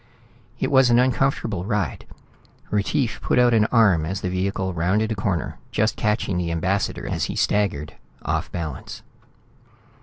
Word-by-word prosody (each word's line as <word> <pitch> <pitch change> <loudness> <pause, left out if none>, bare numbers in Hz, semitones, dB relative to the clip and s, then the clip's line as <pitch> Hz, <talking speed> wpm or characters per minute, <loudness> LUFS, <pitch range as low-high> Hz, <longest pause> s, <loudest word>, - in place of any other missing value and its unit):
It - - -1
was 130 -2 +5
an 120 - +5
uncomfortable 125 -6 +1
ride. 105 -3 -2 0.6
Retief 110 +4 0
put - - 0
out 125 -1 +5
an 110 -2 +4
arm 105 -9 +4
as 95 +5 -3
the 90 - -2
vehicle 95 0 -1
rounded 95 +7 +1
a - - 0
corner, 95 -4 -2
just 110 +1 +1
catching 105 -4 0
the 85 -1 -2
ambassador 95 +4 -1
as - - -1
he - - -5
staggered, 95 -8 0 0.3
off - - -2
balance. 85 -3 -6
100 Hz, 150 wpm, -23 LUFS, 90-115 Hz, 0.6 s, was